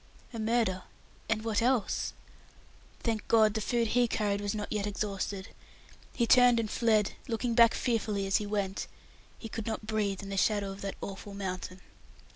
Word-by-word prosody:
A 230 - -5
murder! 220 -4 +1 0.5
and 220 -1 0
what 225 -1 +1
else? 240 -3 +1 0.9
Thank 225 -3 -2
God 220 -2 +5
the 220 - -2
food 235 +1 0
he 245 +1 +3
carried 205 -3 0
was 205 +1 -2
not 210 -1 -4
yet 210 -1 -1
exhausted! 200 -1 -3 0.6
He 235 - +1
turned 245 0 +6
and 220 -2 -2
fled, 220 -3 +2 0.2
looking 235 0 -1
back 230 0 +6
fearfully 215 -5 0
as 195 - +3
he 210 - -3
went. 200 -2 -2 0.5
He 225 - -7
could 225 0 -5
not 220 -1 -3
breathe 210 -2 -1
in 195 - -7
the 195 - -3
shadow 200 0 +1
of 195 - -9
that 195 0 -4
awful 200 +1 -7
mountain. 185 -1 -5
215 Hz, 175 wpm, -30 LUFS, 200-230 Hz, 0.9 s, turned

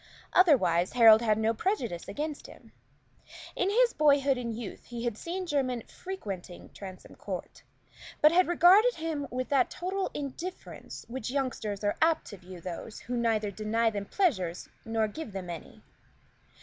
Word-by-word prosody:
Otherwise, 235 - +4
Harold 225 -2 +8
had 215 -2 +2
no 220 +1 +1
prejudice 235 - -2
against 300 0 -4
him. - - -15 0.8
In 370 - +1
his 470 +3 +3
boyhood 280 -2 +4
and 235 -3 -4
youth 230 -5 -8
he 235 -1 -6
had 240 -3 -1
seen 360 - -4
Jermyn 260 -7 -1
frequenting 200 - -7
Transome 190 -2 -10
Court, - - -7 0.6
but 305 - +6
had 360 +2 +4
regarded 380 +8 +6
him 315 -3 -3
with 255 +1 -3
that 270 -3 +3
total 375 +2 -3
indifference 295 +6 -7
with 235 - -11
which 255 -3 -4
youngsters 245 -7 -2
are 205 - 0
apt 325 0 +3
to 205 - -8
view 180 0 -11
those 180 +5 -7
who 245 - -4
neither 225 -3 +1
deny 220 +3 0
them 205 -1 -4
pleasure 200 - +1 0.3
nor 225 -1 0
give 220 0 -7
them 185 -3 -5
any. 165 - -10
245 Hz, 160 wpm, -29 LUFS, 210-320 Hz, 0.8 s, Harold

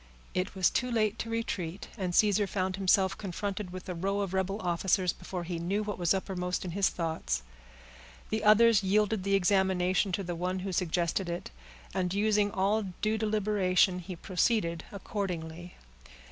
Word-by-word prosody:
It 185 +2 -2
was 185 -2 +3
too 250 - 0
late 220 -2 +1
to 230 - -3
retreat, 200 -5 -3
and 185 -5 -2
Caesar 205 -1 +4
found 190 -1 -1
himself 190 -1 +3
confronted 200 0 -4
with 185 +1 -8
a 180 - -3
row 195 +4 -1
of 195 -2 -3
rebel 190 +2 -1
officers, 180 +1 +1
before 180 0 -6
he 170 0 -4
knew 195 +5 -1
what 205 -2 -4
was 175 -2 +1
uppermost 185 -2 -1
in 180 - -4
his 195 +2 +2
thoughts. 160 - -2 0.9
The 220 0 -1
others 215 0 +6
yielded 210 +1 +2
the 200 0 +2
examination 190 0 +2
to 195 - -1
the 175 -1 -3
one 180 +2 -2
who 195 - -2
suggested 175 +1 0
it, 170 0 -5 0.4
and 180 0 -1
using 210 0 +3
all 200 +2 +1 0.2
due 215 +1 +1
deliberation, 200 -4 +2
he 180 +1 -7
proceeded 170 -2 0
accordingly. 175 -4 -5
190 Hz, 165 wpm, -30 LUFS, 180-205 Hz, 0.9 s, others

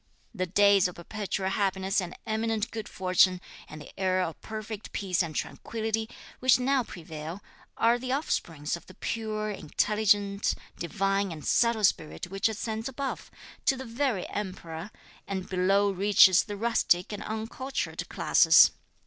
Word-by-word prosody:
The 185 0 -2
days 200 +1 +5
of 180 - -9
perpetual 195 +1 -3
happiness 195 -1 0
and 180 -1 -7
eminent 220 0 -1
good 220 -2 -6
fortune, 185 0 +3 0.3
and 155 - -10
the 150 - -11
era 185 -1 +1
of 165 - -9
perfect 215 -1 -7
peace 190 -3 0
and 165 -3 -4
tranquility, 225 0 -3 0.3
which 255 -1 +5
now 265 +1 +2
prevail, 165 -1 -8 0.3
are 235 +1 +3
the 255 +1 -4
offspring 165 - -2
of 170 - -12
the 185 - -14
pure, 215 -1 -3
intelligent, 205 +3 +1 0.2
divine 195 +2 0
and 155 -2 -8
subtle 235 -2 +2
spirit 175 -1 0
which 195 +3 +1
ascends 220 +2 -4
above, 270 +1 -5 0.4
to 270 - +4
the 265 - -6
very 235 -4 -1
Emperor, 185 -3 -5 0.4
and 190 -2 -4
below 195 +2 +2
reaches 190 -1 +6
the 205 -2 -6
rustic 210 -5 +1
and 205 - -5
uncultured 225 +5 -4
classes. - - +6
200 Hz, 145 wpm, -28 LUFS, 185-220 Hz, 0.4 s, reaches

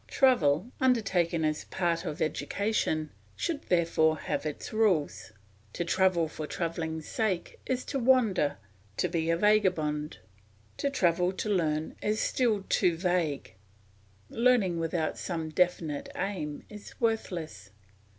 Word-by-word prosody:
Travel, 210 - +3
undertaken 190 -10 +2
as 155 0 0
a - - -15
part 170 -1 -1
of 155 -3 -2
education, 160 -2 -1 0.2
should 320 -4 -2
therefore 165 -3 +3
have 155 - -3
its 150 - -6
rules. 190 - +1 0.4
To 175 - -2
travel 180 -2 +2
for 155 -1 -6
travelling's 160 -2 -3
sake 195 -6 -2
is 255 -1 -1
to 275 - -2
wander, 230 - +3 0.4
to - - +1
be 165 -1 -1
a 165 - +3
vagabond; 170 -7 +1 0.6
to 280 - 0
travel 180 -7 +2
to 210 - -3
learn 160 -5 0
is 215 +1 0
still 225 -6 +1
too 170 -2 +2
vague; 175 - -1 0.7
learning 225 - +2
without 165 -1 -1
some 165 -3 -3
definite 165 -3 0
aim 165 -7 -4
is 210 -1 -12
worthless. 170 - -2
175 Hz, 130 wpm, -29 LUFS, 160-210 Hz, 0.7 s, Travel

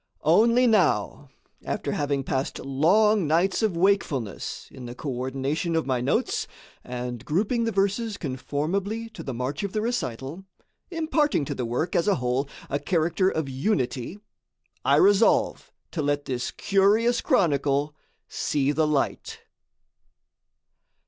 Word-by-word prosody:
Only 230 +10 +5
now, 185 - +2 0.3
after - - -3
having 140 -1 -1
passed 130 +1 -2
long 180 +8 +3
nights 175 +7 +2
of 210 -6 0
wakefulness 170 - 0
in 125 -2 -9
the 120 - -8
coordination 135 +5 -2
of 160 - +1
my 130 -2 0
notes 125 - 0 0.4
and 125 -1 -5
grouping 215 - 0
the 230 - 0
verses 205 +2 0
conformably 180 - -3
to - - -9
the 130 - -5
march 130 +4 -3
of 200 -2 -4
the 215 - 0
recital, 170 - -3 0.5
imparting 315 - +1
to - - -3
the 125 - -3
work, 125 +9 -2
as 170 - +2
a 200 - +4
whole, 125 +3 -1 0.2
a 140 - -1
character 175 +3 +1
of 160 -6 -2
unity, 130 - -1 0.7
I - - +4
resolve 205 +2 +3 0.2
to 165 - -2
let 145 0 0
this 125 -2 -2
curious 210 +5 +2
chronicle 145 -3 +1 0.3
see 145 -1 0
the 155 +1 +1
light. 150 -2 -1
155 Hz, 135 wpm, -25 LUFS, 135-200 Hz, 0.7 s, Only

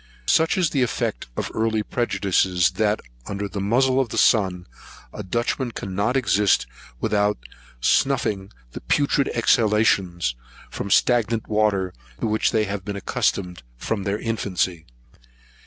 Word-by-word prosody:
Such 160 - +3
is 175 -4 +2
the 140 - +1
effect 115 - -2
of - - -3
early 110 -1 0
prejudices, 95 -6 +1
that, 105 0 +1 0.3
under 100 0 -3
the 100 0 -5
muzle 130 +6 +2
of 130 -3 0
the - - -5
sun, 95 -5 +3 0.5
a - - -6
Dutchman 120 +5 -2
cannot 100 +7 -1
exist 105 - +2 0.3
without 105 +1 +1 0.4
snuffing 95 - +1 0.2
the - - -8
putrid 140 - +1
exhalations 105 - +2 0.4
from 100 - -5
stagnant 115 +1 +2
water, 105 -4 +1 0.3
to - - -2
which 110 0 +1
they 110 - +1
have 100 -1 -4
been 100 0 -5
accustomed 90 -2 -1 0.2
from 100 - -2
their 100 +1 -1
infancy. 95 -7 -2
105 Hz, 135 wpm, -23 LUFS, 95-115 Hz, 0.5 s, Such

